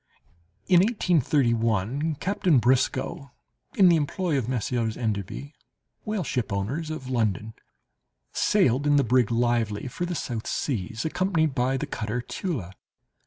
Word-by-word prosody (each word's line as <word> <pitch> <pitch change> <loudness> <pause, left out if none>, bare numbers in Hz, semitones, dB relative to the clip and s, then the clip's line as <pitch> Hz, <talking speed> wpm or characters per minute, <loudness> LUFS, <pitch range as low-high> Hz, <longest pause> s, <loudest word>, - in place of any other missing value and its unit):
In 180 - +6
1831, 140 - +1
Captain 185 -1 +1
Briscoe, 130 +2 +1 0.5
in 190 - +6
the 170 -2 +6
employ 160 +2 -1
of 130 -5 0
the - - -6
Messieurs 115 -2 -1
Enderby, 110 - -3 0.5
whale 215 -3 -1
ship 125 -9 -2
owners 125 +12 -2
of 155 -5 -6
London, 110 -3 -1 0.8
sailed 145 - +2
in 145 - +4
the 140 - +4
brig 125 -2 +3
Lively 115 -2 0
for 175 +8 -4
the 175 0 -3
South 120 -7 -4
Seas, 115 - -2
accompanied 160 -3 +1
by 130 +1 +1
the - - -3
cutter 110 +2 -3
Tula. 120 - -4
130 Hz, 135 wpm, -26 LUFS, 115-160 Hz, 0.8 s, In